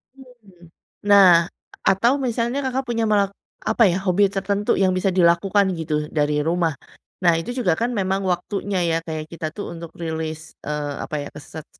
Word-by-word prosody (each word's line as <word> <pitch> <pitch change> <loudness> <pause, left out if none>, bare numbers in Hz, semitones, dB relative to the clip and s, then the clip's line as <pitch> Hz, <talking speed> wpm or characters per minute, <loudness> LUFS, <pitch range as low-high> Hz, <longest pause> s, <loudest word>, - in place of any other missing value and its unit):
Hmm. 240 -9 -18 0.5
Nah, 200 -2 +8 0.6
atau 235 +7 +3
misalnya 235 +2 -1
Kakak 260 +1 -1
punya 230 -1 -1
mak 200 -2 +2 0.4
apa 230 - +4
ya, - - -1
hobi 190 +2 +3
tertentu 200 +1 -1
yang 185 - +3
bisa 190 +1 +1
dilakukan 185 +3 +4
gitu 155 -1 -3 0.2
dari 150 0 +2
rumah. 170 -1 +1 0.5
Nah, 170 -1 +5
itu 165 - -6
juga 185 -9 +2
kan 235 - +1
memang 190 0 0
waktunya 195 +2 -2
ya, 165 - +1
kayak 155 -1 -4
kita 165 -1 -6
tuh 205 - -5
untuk 170 0 -8
rilis, 160 -1 -3 0.3
eee, 150 -1 -2
apa - - -5
ya, - - -7 0.2
set 155 -1 -8
190 Hz, 170 wpm, -22 LUFS, 165-205 Hz, 0.6 s, Nah